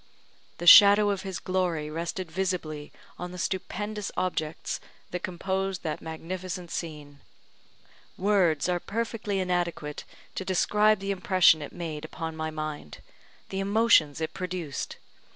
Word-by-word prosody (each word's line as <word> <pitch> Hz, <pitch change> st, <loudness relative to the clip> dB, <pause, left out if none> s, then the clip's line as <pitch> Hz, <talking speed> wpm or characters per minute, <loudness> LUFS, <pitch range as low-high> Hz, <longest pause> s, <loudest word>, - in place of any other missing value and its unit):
The 175 Hz, -, -5 dB
shadow 205 Hz, +2 st, +9 dB
of 195 Hz, -2 st, -2 dB
His 190 Hz, -2 st, -5 dB
glory 180 Hz, -5 st, -1 dB
rested 170 Hz, +2 st, -4 dB
visibly 165 Hz, -5 st, -3 dB, 0.3 s
on 180 Hz, 0 st, -5 dB
the 180 Hz, -, -8 dB
stupendous 205 Hz, +3 st, -3 dB
objects 160 Hz, -4 st, -2 dB, 0.3 s
that 180 Hz, -, -3 dB
composed 190 Hz, +1 st, -2 dB
that 155 Hz, -3 st, -3 dB
magnificent 175 Hz, +2 st, -6 dB
scene; 150 Hz, -4 st, -6 dB, 1.0 s
words 185 Hz, -6 st, +2 dB
are 180 Hz, -1 st, +1 dB
perfectly 220 Hz, 0 st, -3 dB
inadequate 175 Hz, -5 st, -2 dB, 0.3 s
to -, -, -4 dB
describe 210 Hz, +3 st, +3 dB
the 195 Hz, 0 st, -2 dB
impression 185 Hz, -4 st, +4 dB
it 145 Hz, -, -6 dB
made 160 Hz, -3 st, -5 dB
upon 160 Hz, -2 st, -5 dB
my 160 Hz, 0 st, -3 dB
mind 155 Hz, -, -6 dB, 0.5 s
the 190 Hz, -, -3 dB
emotions 195 Hz, -7 st, +4 dB
it 160 Hz, -, -3 dB
produced. 180 Hz, -6 st, -4 dB
180 Hz, 130 wpm, -27 LUFS, 160-195 Hz, 1.0 s, shadow